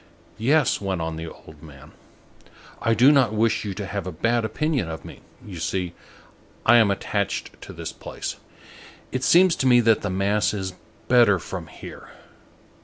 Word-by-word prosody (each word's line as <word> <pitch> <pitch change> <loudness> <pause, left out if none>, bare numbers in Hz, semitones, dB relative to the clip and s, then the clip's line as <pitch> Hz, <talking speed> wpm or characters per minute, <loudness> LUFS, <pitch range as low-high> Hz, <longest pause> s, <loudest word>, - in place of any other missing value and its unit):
"Yes!" 135 +2 +2
went 95 -3 -2
on 80 0 -3
the 80 +1 -6
old 75 -1 -15
man, 70 -4 -14 0.9
"I 115 -1 +2
do 130 +5 +6
not 130 -7 +3
wish 115 +1 +1
you 100 -3 -4
to 100 - -5
have 95 -1 -4
a - - -3
bad 115 +8 0
opinion 125 - -1
of 80 - -7
me. - - -11 0.3
You 90 -5 -8
see, 90 +1 -2 0.7
I 120 +1 +7
am 110 -3 +5
attached 100 0 -3
to - - -9
this - - -6
place. - - -6 0.7
It 130 0 -3
seems 180 +3 +5
to 130 - +1
me 120 -1 +6
that 115 -1 +3
the - - -2
mass 100 +2 +1
is 95 -2 -4 0.3
better 120 -5 +5
from 85 -1 -7
here. 70 - -11
105 Hz, 175 wpm, -24 LUFS, 90-120 Hz, 0.9 s, I